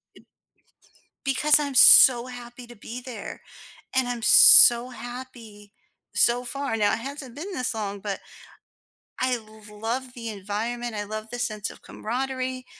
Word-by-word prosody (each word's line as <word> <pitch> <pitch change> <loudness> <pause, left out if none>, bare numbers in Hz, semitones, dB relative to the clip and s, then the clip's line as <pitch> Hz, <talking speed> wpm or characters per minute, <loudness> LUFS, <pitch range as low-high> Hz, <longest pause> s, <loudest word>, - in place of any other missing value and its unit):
eh, - - -18
b - - -33 1.0
because 295 +3 +2
I'm 280 -2 -5
so 250 -1 +7
happy 245 0 -12
to 240 - -14
be 235 +3 -10
there, 245 -5 -10 0.5
and 260 -1 +1
I'm 240 -2 -5
so 240 +2 +7
happy 240 -5 -12 0.4
so 245 +1 +2
far. 275 -1 -4
Now 205 -1 0
it - - -3
hasn't 270 -1 -9
been 370 +6 -8
this 255 -4 -3
long, 205 -2 -6
but 200 -1 -6 1.0
I 255 -1 -1 0.3
love 240 +4 -6
the 230 -2 -8
environment, 220 +4 -6
I 205 - -4
love 215 +1 -8
the 245 - -7
sense 215 -3 -4
of - - -15
camaraderie, 255 +1 -6
240 Hz, 150 wpm, -23 LUFS, 220-255 Hz, 1.0 s, so